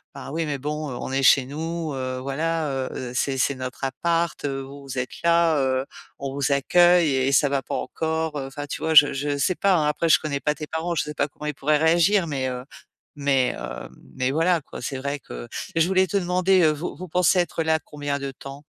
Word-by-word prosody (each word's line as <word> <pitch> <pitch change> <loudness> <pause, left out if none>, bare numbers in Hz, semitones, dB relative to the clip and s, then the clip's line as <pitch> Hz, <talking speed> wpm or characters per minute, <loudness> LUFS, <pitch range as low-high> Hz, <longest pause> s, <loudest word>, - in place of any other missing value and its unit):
«Ben, - - -8
oui 165 +2 -1
mais 145 - -2
bon 150 +2 -4
on 125 +1 -5
est 135 0 0
chez 130 0 +6
nous, 160 +3 -4
heu, 130 -1 -3
voilà, 155 +4 -1 0.2
heu, 125 -1 -5
c'est 135 +1 0
c'est 140 - +2
notre 130 0 -7
appart, 165 +5 -1
heu, 135 -1 -2
vous 140 +1 -10
vous 135 -1 -7
êtes 125 0 -2
là, 170 -1 +4
heu, 130 0 0 0.3
on 135 -1 -4
vous 140 0 -1
accueille 175 +3 +4
et 130 +1 +1
ça 145 +1 +4
va 140 -1 0
pas - - -5
encore» 160 -1 -2
heu, 135 - -5
enfin 145 +2 -6
tu - - -6
vois? 160 0 0
Je 145 -1 +8
je 145 +1 -2
sais 185 +6 +1
pas, 195 +1 +3
hein 155 -3 +2
après 160 +2 0
je - - +6
connais 145 -3 -3
pas 150 +1 0
tes 150 +1 -6
parents. 165 +2 -2
Je - - +1
sais 150 - -6
pas 145 -1 0
comment 150 +1 -11
ils 150 - -1
pourraient 150 +2 +1
réagir 170 +5 +3
mais, 135 -4 -2
heu, 125 0 -5 0.6
mais, 135 -3 +2
hem, - - -6 0.3
mais 130 0 0
voilà 165 +2 +2
quoi. - - -10
C'est 130 +2 -3
vrai 140 +1 -3
que - - -9 0.3
et 165 - +1
je 165 - +5
voulais 190 0 +3
te 185 - -1
demander, 185 +1 +2
heu, 155 - +5
vous 155 +4 -5
vous 185 - -8
pensez 180 +2 +3
être 175 -2 0
là 160 0 +2
combien 145 -1 -4
de 140 -1 -4
temps? 135 +2 -10
145 Hz, 240 wpm, -24 LUFS, 135-165 Hz, 0.6 s, Je